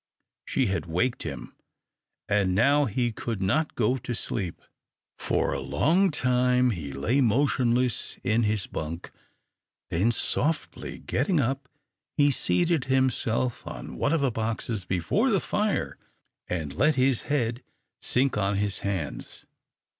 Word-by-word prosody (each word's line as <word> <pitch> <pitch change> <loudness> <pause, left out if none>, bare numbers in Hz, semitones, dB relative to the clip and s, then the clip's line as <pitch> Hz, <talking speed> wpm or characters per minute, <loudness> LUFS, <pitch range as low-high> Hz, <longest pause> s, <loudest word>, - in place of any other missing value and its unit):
She 135 - +1
had 95 -3 -1
waked 115 +10 0
him, - - -6 0.7
and 95 -3 +2
now 140 +7 +4
he 120 +2 0
could 115 -1 -4
not 140 +12 0
go 125 +3 +2
to 120 +1 -4
sleep. 95 -3 -4 0.6
For - - 0
a - - -2
long 185 +5 +2
time 125 -3 +2
he 80 -9 -5
lay 110 - +1
motionless 125 -1 +1
in 110 +3 +2
his 105 -3 0
bunk, 80 +2 -5 0.8
then 95 +7 +2
softly 150 +6 -1
getting 150 +7 0
up, 135 0 -1 0.5
he 145 -1 +5
seated 170 +2 +1
himself 130 -2 +1
on - - -7
one 145 - 0
of 165 -2 +2
the 135 -2 +2
boxes 110 -2 -3
before 90 -3 +1
the - - +3
fire, - - -1 0.5
and 80 -6 -3
let 150 - +3
his 130 -2 +2
head 120 -4 0 0.4
sink 130 -3 +1
on 100 0 +1
his 100 0 -1
hands. 95 -7 -4
120 Hz, 135 wpm, -27 LUFS, 100-135 Hz, 0.8 s, he